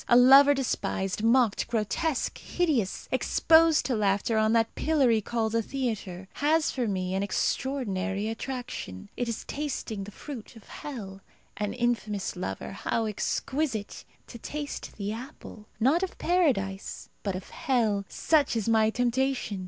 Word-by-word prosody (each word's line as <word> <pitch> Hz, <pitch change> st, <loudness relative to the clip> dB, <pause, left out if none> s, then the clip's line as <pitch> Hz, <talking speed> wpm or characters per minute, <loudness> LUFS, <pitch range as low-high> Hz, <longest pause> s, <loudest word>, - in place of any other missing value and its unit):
A 240 Hz, -, +6 dB
lover 275 Hz, +3 st, +8 dB
despised, 200 Hz, -7 st, -2 dB
mocked, 230 Hz, -1 st, +3 dB
grotesque, 240 Hz, +7 st, -1 dB
hideous, 290 Hz, -, -1 dB
exposed 325 Hz, -1 st, +4 dB
to 255 Hz, -, 0 dB
laughter 205 Hz, +1 st, +1 dB
on 220 Hz, 0 st, +3 dB
that 225 Hz, -1 st, +2 dB
pillory 265 Hz, -8 st, +2 dB
called 225 Hz, 0 st, -1 dB
a 230 Hz, -, +2 dB
theatre, 215 Hz, -8 st, -4 dB
has 305 Hz, +2 st, +2 dB
for 250 Hz, -3 st, -1 dB
me 185 Hz, -2 st, -2 dB
an 190 Hz, -, 0 dB
extraordinary 205 Hz, -3 st, -1 dB
attraction. 225 Hz, -, -5 dB
It 245 Hz, -1 st, -2 dB
is 230 Hz, -, -4 dB
tasting 260 Hz, -8 st, -4 dB
the -, -, -8 dB
fruit 245 Hz, -1 st, -9 dB
of 225 Hz, -, -13 dB
hell. 200 Hz, -9 st, -8 dB, 0.3 s
An 210 Hz, 0 st, -2 dB
infamous 230 Hz, -5 st, -1 dB
lover, 185 Hz, -, -4 dB
how 225 Hz, +3 st, -1 dB
exquisite! 220 Hz, +2 st, -2 dB, 0.2 s
To 235 Hz, -, -10 dB
taste 290 Hz, +4 st, -5 dB
the 205 Hz, 0 st, -3 dB
apple, 230 Hz, -3 st, -10 dB
not 275 Hz, +9 st, +3 dB
of 380 Hz, -, -3 dB
Paradise, 245 Hz, -, 0 dB
but 195 Hz, -3 st, -2 dB
of 185 Hz, -, -8 dB
hell 220 Hz, -6 st, +1 dB
such 300 Hz, -6 st, +2 dB
is 225 Hz, -2 st, -1 dB
my 220 Hz, -1 st, +4 dB
temptation. 245 Hz, -3 st, 0 dB
230 Hz, 145 wpm, -28 LUFS, 205-270 Hz, 0.3 s, lover